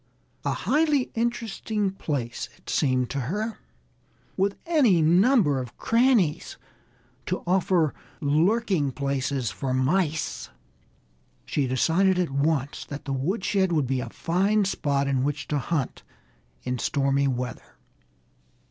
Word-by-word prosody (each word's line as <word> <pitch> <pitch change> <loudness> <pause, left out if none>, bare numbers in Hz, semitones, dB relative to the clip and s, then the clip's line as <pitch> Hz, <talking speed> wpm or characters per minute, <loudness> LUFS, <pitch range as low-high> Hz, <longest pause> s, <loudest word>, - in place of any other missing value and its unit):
A - - 0
highly 300 -4 +1
interesting 225 -3 -1
place, 140 -10 -4
it - - -9
seemed 130 -4 +1
to 140 - -2
her, 210 - -3 0.8
with 200 +1 +1
any 280 - +4
number 175 - +4
of 120 -1 -9
crannies 230 - +2 0.7
to 180 - -2
offer 175 -4 +2 0.3
lurking 165 - +2
places 140 -4 -1
for 130 +9 -2
mice. 155 +3 0 1.0
She 140 -3 0
decided 170 +9 +2
at 180 -5 0
once 140 0 0
that 145 0 -8
the 140 - -2
woodshed 190 +6 0
would 155 -5 +2
be 130 +1 -1
a - - -4
fine 200 +5 +1
spot 140 -7 0
in 135 -2 +1
which 145 +1 -2
to 150 - +1
hunt 140 -1 -2 0.6
in 125 -1 -2
stormy 140 0 +1
weather. 125 -1 -4
155 Hz, 120 wpm, -25 LUFS, 135-195 Hz, 1.0 s, any